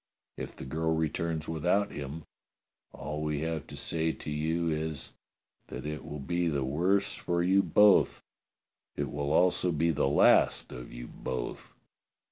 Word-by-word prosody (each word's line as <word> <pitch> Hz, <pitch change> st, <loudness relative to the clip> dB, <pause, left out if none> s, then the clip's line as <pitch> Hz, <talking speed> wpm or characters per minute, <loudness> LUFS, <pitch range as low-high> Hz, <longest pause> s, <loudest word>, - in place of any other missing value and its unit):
If -, -, -7 dB
the -, -, -8 dB
girl 80 Hz, +4 st, 0 dB
returns 80 Hz, 0 st, -1 dB
without 90 Hz, +5 st, +1 dB
him, 75 Hz, +3 st, -6 dB, 0.7 s
all 75 Hz, 0 st, -5 dB
we 75 Hz, -1 st, -1 dB
have 80 Hz, -2 st, -3 dB
to -, -, -9 dB
say 80 Hz, 0 st, 0 dB
to 75 Hz, -, -7 dB
you 80 Hz, +3 st, 0 dB
is 80 Hz, -2 st, -3 dB, 0.5 s
that -, -, -7 dB
it 75 Hz, 0 st, -4 dB
will 75 Hz, -, -6 dB
be 85 Hz, +5 st, -1 dB
the 70 Hz, -4 st, 0 dB
worse 90 Hz, +9 st, +1 dB
for 85 Hz, 0 st, -1 dB
you 95 Hz, +2 st, +4 dB
both; 105 Hz, 0 st, +4 dB, 0.7 s
it -, -, -3 dB
will 70 Hz, 0 st, -2 dB
also 90 Hz, +2 st, +3 dB
be 85 Hz, +1 st, +2 dB
the 70 Hz, -, +1 dB
last 70 Hz, -, +4 dB
of 60 Hz, -1 st, -8 dB
you -, -, -7 dB
both. 60 Hz, 0 st, -6 dB
80 Hz, 155 wpm, -30 LUFS, 75-85 Hz, 0.7 s, you